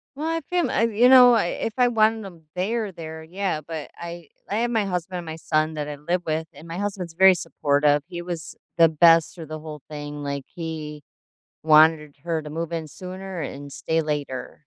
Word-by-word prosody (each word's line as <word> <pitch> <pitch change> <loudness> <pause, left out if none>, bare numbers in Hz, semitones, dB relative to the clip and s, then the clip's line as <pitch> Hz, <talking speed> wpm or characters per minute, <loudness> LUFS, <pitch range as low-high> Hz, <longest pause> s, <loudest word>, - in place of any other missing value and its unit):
Well, 305 +3 -3
I 330 - 0
have 330 -3 -4
fam 355 -1 +1
I've 230 -1 +1
you 245 +4 +5
know, 250 -2 +9
I 220 -7 +2
if 225 - -3
I 250 -1 +4
wanted 220 -1 +2
'em 170 -4 -12
there, 210 +2 -1
there, 160 -1 -8
yeah, 175 0 -3
but 155 0 -7
I 170 -2 -8 0.2
I 205 - -1
have 240 +1 0
my 220 -3 +1
husband 180 -1 -3
and 175 - -6
my 160 0 -6
son 155 0 0
that 150 -1 -4
I 145 - -5
live 170 +5 -1
with, 160 0 -2
and 155 +4 -13
my 165 - -5
husband's 190 -4 -4
very 190 +2 +7
supportive, 145 -3 +1
he 175 -1 -6
was 175 -2 -6 0.2
the 165 -1 +7
best 165 +1 +5
through 165 -3 -9
the 155 +1 -6
whole 155 -2 -9
thing, 145 -1 -6
like, 140 -1 -4
he 155 -3 -6 0.6
wanted 155 -1 +5
her 165 -2 -1
to 150 - -8
move 165 +2 -4
in 160 -2 -3
sooner 185 +2 -7
and 140 0 -7
stay 160 +3 -1
later. 145 -1 -5
165 Hz, 215 wpm, -24 LUFS, 155-190 Hz, 0.6 s, know